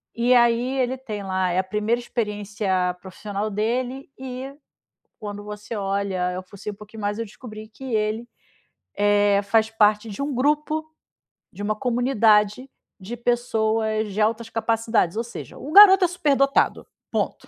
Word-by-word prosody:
E 240 Hz, +2 st, +3 dB
aí, 240 Hz, +2 st, +3 dB
ele 255 Hz, +1 st, 0 dB
tem 215 Hz, -6 st, -6 dB
lá 185 Hz, -1 st, 0 dB
é 180 Hz, -, +1 dB
a -, -, +1 dB
primeira 210 Hz, +5 st, -1 dB
experiência 205 Hz, -5 st, -2 dB
profissional 205 Hz, +2 st, -5 dB
dele 245 Hz, +6 st, -2 dB
e 260 Hz, +1 st, -7 dB, 0.7 s
quando 205 Hz, -1 st, -6 dB
você 210 Hz, +2 st, -7 dB
olha 195 Hz, -2 st, -1 dB
eu 185 Hz, -, -4 dB
fucei 200 Hz, +2 st, -8 dB
um -, -, -11 dB
pouquinho 215 Hz, +2 st, -11 dB
mais, 205 Hz, +1 st, -2 dB
eu 230 Hz, -, -2 dB
descobri 215 Hz, 0 st, -10 dB
que 215 Hz, +4 st, -15 dB
ele, 215 Hz, +2 st, -1 dB, 0.7 s
eh, 205 Hz, 0 st, +3 dB
faz 220 Hz, +2 st, +2 dB
parte 215 Hz, 0 st, +2 dB
de 210 Hz, +6 st, -5 dB
um 280 Hz, -1 st, -2 dB
grupo, 300 Hz, +4 st, 0 dB, 0.7 s
de -, -, -10 dB
uma 215 Hz, +1 st, 0 dB
comunidade, 230 Hz, -1 st, +2 dB, 0.3 s
de 220 Hz, +6 st, -7 dB
pessoas 220 Hz, -3 st, 0 dB
de 210 Hz, -, -1 dB
altas 225 Hz, +1 st, 0 dB
capacidades, 225 Hz, -4 st, 0 dB
ou 230 Hz, -, 0 dB
seja, 235 Hz, -, -9 dB
o 295 Hz, -, -8 dB
garoto 385 Hz, -1 st, +9 dB
é -, -, +2 dB
superdotado, 280 Hz, -5 st, +1 dB, 0.3 s
ponto. -, -, -2 dB
220 Hz, 155 wpm, -23 LUFS, 205-245 Hz, 0.7 s, garoto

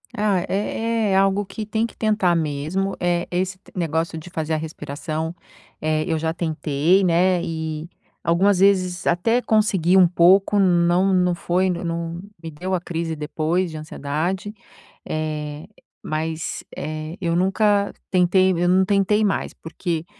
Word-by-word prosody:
Ah, 205 Hz, -3 st, +2 dB
é -, -, -1 dB, 0.5 s
é -, -, +1 dB
é -, -, +2 dB
algo 195 Hz, +1 st, +2 dB
que 215 Hz, +2 st, -6 dB
tem 220 Hz, +2 st, 0 dB
que -, -, -9 dB
tentar 210 Hz, -5 st, +2 dB
mesmo, 160 Hz, +5 st, -1 dB
eh, 175 Hz, -1 st, 0 dB
esse 185 Hz, +1 st, -2 dB, 0.2 s
negócio 165 Hz, -1 st, -1 dB
de 160 Hz, +3 st, -9 dB
fazer 160 Hz, -2 st, -3 dB
a -, -, +1 dB
respiração, 160 Hz, +1 st, -5 dB, 0.5 s
eh, 155 Hz, 0 st, 0 dB
eu 165 Hz, -2 st, 0 dB
já 160 Hz, +1 st, -1 dB
tentei, 160 Hz, +2 st, +1 dB
né, 180 Hz, 0 st, +3 dB
e, 160 Hz, -1 st, -4 dB, 0.3 s
algumas 185 Hz, +3 st, +3 dB
vezes, 185 Hz, -3 st, +2 dB
até 225 Hz, +8 st, +2 dB
consegui 195 Hz, -6 st, +2 dB
um 185 Hz, -, +7 dB
pouco, 190 Hz, +4 st, +4 dB
não 180 Hz, +1 st, +3 dB
não 180 Hz, -1 st, +2 dB
foi 180 Hz, +2 st, 0 dB
não 170 Hz, -1 st, -3 dB, 0.2 s
me 165 Hz, -1 st, -7 dB
deu 185 Hz, +5 st, -4 dB
a 185 Hz, -, +2 dB
crise 165 Hz, -2 st, -3 dB
depois 155 Hz, +4 st, -1 dB
de 155 Hz, -, -7 dB
ansiedade, 155 Hz, +6 st, -3 dB, 0.5 s
eh, 155 Hz, 0 st, -4 dB, 0.4 s
mas, 160 Hz, +1 st, -3 dB
eh, 155 Hz, +2 st, -5 dB
eu 170 Hz, -2 st, 0 dB
nunca 200 Hz, +2 st, +2 dB, 0.2 s
tentei 185 Hz, +1 st, +3 dB
eu 175 Hz, 0 st, +1 dB
não 185 Hz, +1 st, +4 dB
tentei 205 Hz, +2 st, +2 dB
mais, 195 Hz, -, -1 dB
porque 165 Hz, 0 st, -4 dB
175 Hz, 150 wpm, -22 LUFS, 160-190 Hz, 0.5 s, um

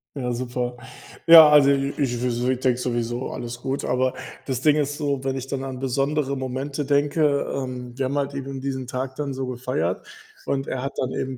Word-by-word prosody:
Ja, 125 Hz, -3 st, -2 dB
super. 125 Hz, 0 st, -3 dB, 0.5 s
Ja, 165 Hz, -2 st, +11 dB
also 145 Hz, -2 st, +6 dB
i 140 Hz, 0 st, +1 dB
ich 125 Hz, -4 st, -1 dB
w 125 Hz, 0 st, 0 dB
ich 130 Hz, -, -1 dB
denke 130 Hz, -2 st, +2 dB
sowieso, 120 Hz, 0 st, -2 dB
alles 120 Hz, 0 st, -6 dB
gut, 135 Hz, +1 st, -2 dB
aber 130 Hz, 0 st, +1 dB, 0.3 s
das 130 Hz, -2 st, -2 dB
Ding 150 Hz, +1 st, +4 dB
ist 145 Hz, -1 st, -1 dB
so, 140 Hz, -3 st, -1 dB
wenn 135 Hz, 0 st, -1 dB
ich 130 Hz, -, -4 dB
dann 135 Hz, 0 st, -3 dB
an 130 Hz, -1 st, -5 dB
besondere 140 Hz, +2 st, 0 dB
Momente 135 Hz, +2 st, -3 dB
denke, 145 Hz, +2 st, +2 dB, 0.3 s
ähm 125 Hz, -2 st, -5 dB
wir 135 Hz, -, 0 dB
haben 140 Hz, +2 st, -2 dB
halt 140 Hz, 0 st, -1 dB
eben 135 Hz, -1 st, -5 dB
diesen 130 Hz, -1 st, -4 dB
Tag 130 Hz, +1 st, -4 dB
dann 145 Hz, -2 st, -3 dB
so 130 Hz, 0 st, -3 dB
gefeiert 125 Hz, -9 st, -2 dB, 0.4 s
und 135 Hz, 0 st, -1 dB
er 125 Hz, -, -3 dB
hat 135 Hz, +2 st, -4 dB
dann 130 Hz, -, -1 dB
eben 130 Hz, -1 st, -3 dB
130 Hz, 205 wpm, -24 LUFS, 125-140 Hz, 0.5 s, Ja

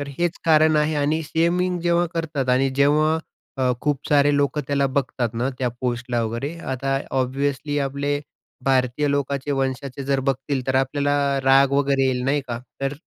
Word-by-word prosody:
तर 145 Hz, -, -5 dB
हेच 175 Hz, 0 st, 0 dB
कारण 155 Hz, -1 st, +5 dB
आहे 150 Hz, +1 st, +2 dB
आणि 150 Hz, +3 st, +1 dB
शेमिंग 175 Hz, +3 st, +1 dB
जेव्हा 175 Hz, 0 st, +2 dB
करतात 150 Hz, -6 st, -2 dB
आणि 130 Hz, +2 st, +2 dB
जेव्हा 150 Hz, +3 st, +3 dB, 0.4 s
अ, 130 Hz, -1 st, +2 dB
खूप 145 Hz, -2 st, -2 dB
सारे 145 Hz, 0 st, +4 dB
लोकं 145 Hz, +1 st, +1 dB
त्याला 140 Hz, -1 st, +1 dB
बघतात 130 Hz, -3 st, -1 dB
ना, 125 Hz, +3 st, -1 dB
त्या 125 Hz, -2 st, 0 dB
पोस्टला 120 Hz, -1 st, -1 dB
वगैरे 120 Hz, +8 st, -3 dB, 0.2 s
आता 135 Hz, +1 st, -1 dB, 0.2 s
ऑब्व्हियसली 140 Hz, +3 st, -1 dB
आपले 145 Hz, +1 st, -2 dB, 0.4 s
भारतीय 130 Hz, +2 st, +1 dB
लोकाचे 140 Hz, 0 st, -1 dB
वंशाचे 135 Hz, 0 st, -3 dB
जर 135 Hz, 0 st, +1 dB
बघतील, 135 Hz, 0 st, -2 dB
तर 130 Hz, -, 0 dB
आपल्याला 140 Hz, +2 st, +1 dB, 0.3 s
राग 135 Hz, +1 st, +5 dB
वगैरे 140 Hz, -1 st, +2 dB
येईल 125 Hz, -1 st, 0 dB
नाही 145 Hz, +2 st, +1 dB
का, 120 Hz, 0 st, -3 dB, 0.2 s
तर 135 Hz, +1 st, -1 dB
140 Hz, 165 wpm, -22 LUFS, 130-145 Hz, 0.4 s, कारण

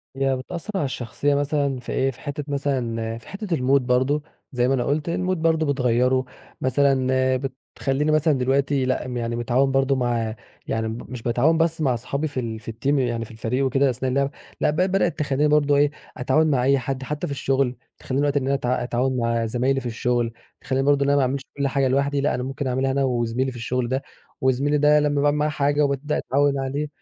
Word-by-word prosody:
هي 135 Hz, 0 st, +1 dB
بتأثر 170 Hz, +10 st, -5 dB
على 170 Hz, -7 st, +1 dB
الشخصية 135 Hz, +3 st, -1 dB
مثلًا 140 Hz, -2 st, 0 dB
في 125 Hz, -, -7 dB
إيه، 135 Hz, +1 st, +1 dB
في 130 Hz, -, -17 dB
حتّة 145 Hz, +1 st, -4 dB
مثلًا 120 Hz, -6 st, -2 dB
في 115 Hz, -, -15 dB
حتة 200 Hz, +2 st, -6 dB
الmood 130 Hz, +2 st, +3 dB
برضه 130 Hz, +4 st, +1 dB, 0.3 s
زي 125 Hz, -2 st, +1 dB
ما 135 Hz, -, +2 dB
أنا 125 Hz, -, +1 dB
قلت 150 Hz, +3 st, -1 dB
الmood 185 Hz, +2 st, 0 dB
برضه 160 Hz, -1 st, +2 dB
بتغيّره، 130 Hz, -2 st, +2 dB, 0.4 s
مثلًا 130 Hz, 0 st, +2 dB, 0.7 s
بتخليني 145 Hz, +3 st, 0 dB
مثلًا 155 Hz, 0 st, +3 dB
دلوقتي 135 Hz, +1 st, +1 dB
لأ 130 Hz, 0 st, -1 dB
م 125 Hz, -, -4 dB
يعني 115 Hz, 0 st, -2 dB
متعاون 125 Hz, +3 st, +1 dB
برضه 135 Hz, 0 st, +2 dB
مع 120 Hz, -3 st, -1 dB, 0.3 s
يعني 110 Hz, 0 st, -1 dB
م 110 Hz, +1 st, -4 dB
ب -, -, -10 dB
مش 125 Hz, -3 st, -6 dB
باتعاون 125 Hz, +8 st, +2 dB
بس 165 Hz, -1 st, +1 dB
مع 135 Hz, -4 st, +2 dB
اصحابي 135 Hz, +6 st, -2 dB
في 140 Hz, -3 st, -4 dB
ال 115 Hz, -3 st, -4 dB
في 115 Hz, +1 st, -7 dB
الteam 140 Hz, +5 st, 0 dB
يعني 120 Hz, -2 st, -1 dB
في 115 Hz, -, -13 dB
الفريق 120 Hz, +4 st, -1 dB
وكده 135 Hz, +1 st, +2 dB
أثناء 130 Hz, +1 st, -1 dB
اللعب. 140 Hz, +1 st, +1 dB, 0.3 s
لأ -, -, +3 dB
ب 150 Hz, -, -1 dB
بدأت 185 Hz, -1 st, +1 dB
تخليني 145 Hz, 0 st, +1 dB
برضه 145 Hz, -1 st, +3 dB
إيه، 145 Hz, 0 st, +3 dB, 0.3 s
أتعاون 135 Hz, +5 st, +2 dB
مع 125 Hz, -3 st, +2 dB
أي 140 Hz, +2 st, +4 dB
حد 130 Hz, +1 st, -4 dB
حتى 150 Hz, +2 st, -3 dB
في 140 Hz, -, -3 dB
الشغل، 135 Hz, -1 st, 0 dB, 0.2 s
تخليني 130 Hz, +1 st, -2 dB
دلوقتي 145 Hz, 0 st, +2 dB
إن 130 Hz, -, -4 dB
أنا 135 Hz, -, +1 dB
اتع 125 Hz, -2 st, -1 dB
أتعاون 130 Hz, +2 st, 0 dB
مع 115 Hz, -1 st, 0 dB
زَمايْلي 125 Hz, +4 st, +1 dB
في 130 Hz, -, -10 dB
الشغل، 120 Hz, 0 st, -1 dB, 0.3 s
تخليني 135 Hz, +1 st, -1 dB
برضه 140 Hz, -1 st, +3 dB
إن 140 Hz, -, +1 dB
أنا 145 Hz, -, +4 dB
ما 140 Hz, -, +4 dB
أعملش 130 Hz, +1 st, 0 dB, 0.2 s
كل 140 Hz, -, +1 dB
حاجة 135 Hz, 0 st, +1 dB
لوحدي 140 Hz, +1 st, +1 dB
لأ، 145 Hz, -, +1 dB
أنا 125 Hz, -, -3 dB
ممكن 135 Hz, +1 st, -4 dB
أعملها 130 Hz, +1 st, 0 dB
أنا 135 Hz, +1 st, +1 dB
وزميلي 125 Hz, 0 st, 0 dB
في 125 Hz, -, -9 dB
الشغل 120 Hz, +1 st, -1 dB
ده، 130 Hz, +1 st, 0 dB, 0.4 s
وزميلي 135 Hz, +3 st, +2 dB
ده 150 Hz, +1 st, +5 dB
لما 145 Hz, -1 st, +1 dB
باعمل 145 Hz, 0 st, +2 dB
معاه 150 Hz, +1 st, +1 dB
حاجة 145 Hz, 0 st, +1 dB
وبابدأ 140 Hz, +2 st, -1 dB
أتعود 140 Hz, +1 st, +1 dB
عليه 140 Hz, +3 st, -2 dB
135 Hz, 220 wpm, -23 LUFS, 125-145 Hz, 0.7 s, ده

